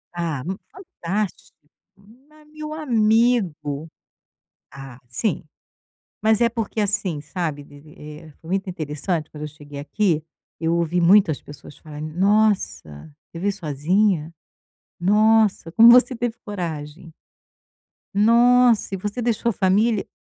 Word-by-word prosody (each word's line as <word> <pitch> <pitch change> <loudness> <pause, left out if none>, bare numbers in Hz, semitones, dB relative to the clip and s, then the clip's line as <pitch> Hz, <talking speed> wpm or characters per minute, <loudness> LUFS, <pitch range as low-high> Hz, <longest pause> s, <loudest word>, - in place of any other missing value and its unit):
Ah, 160 -6 -3
mu 190 +2 -4
fantástico, 210 - -5 0.4
ma 270 +10 -22
meu 305 0 -9
amigo 215 - +1 0.8
ah, 135 -3 -11
sim. 165 - -2 0.8
Mas 220 0 +3
é 235 - +5
porque, 225 -2 -4
assim, 195 -6 -1
sabe, 150 -2 -4
vi 145 0 -16
vi 150 0 -17 0.3
eh, 160 -2 -15
muito 190 +3 -3
interessante 155 0 -3
quando 150 - -11
eu - - -4
cheguei 145 -1 -12
aqui, 155 +2 0 0.4
eu 165 0 0
ouvi 170 +1 0
muitas 180 -3 +4
pessoas 145 0 -13
falarem: 155 -1 -8
"Nossa, 195 - 0 0.2
você 165 - -9
veio 200 +2 0
sozinha? 170 0 0 0.7
Nossa, 210 -2 +3
como 230 +5 +8
você 250 +1 +6
teve 235 -1 -3
coragem?". 165 -4 -6 1.0
"Nossa 235 +1 +4
e - - -1
você 205 +5 -4
deixou 235 0 0
a - - -1
família?" 205 +3 +1
190 Hz, 125 wpm, -22 LUFS, 155-220 Hz, 1.0 s, como